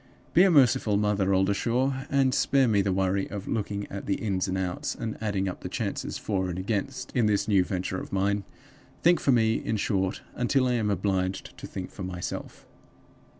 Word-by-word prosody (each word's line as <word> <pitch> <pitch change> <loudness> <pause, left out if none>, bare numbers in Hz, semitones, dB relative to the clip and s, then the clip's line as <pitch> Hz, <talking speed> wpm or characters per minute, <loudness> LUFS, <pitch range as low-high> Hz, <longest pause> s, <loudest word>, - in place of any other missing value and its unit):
Be 175 - +6
a 195 - +6
merciful 125 - +4
Mother 100 -2 +1
Oldershaw, 120 +8 +1
and 135 -2 +3
spare 135 -2 +3
me 105 -3 +3
the 100 0 0
worry 95 +1 0
of 100 -1 -6
looking 100 -2 -2
at 100 - -6
the 100 - +1
Ins 95 -3 -1
and 95 0 -1
Outs, 90 -1 -2
and 110 -1 -4
adding 100 -3 -1
up 90 - -4
the - - -5
chances - - -3
For 95 -3 -1
and 90 - -4
Against, 115 +7 -3
in 120 -4 +3
this 105 -1 +1
new 100 -4 +4
venture 95 0 -3
of - - -9
mine. 100 +1 +1 0.6
Think 175 +1 +5
for 140 - +2
me, 115 -2 +3
in 110 - -2
short, 95 -2 -1
until 130 +2 +1
I 125 - +1
am 110 -3 0
obliged 95 -1 -1
to - - -9
think 95 -2 -6
for - - -10
myself. 90 -1 -5
100 Hz, 195 wpm, -27 LUFS, 95-120 Hz, 0.6 s, Be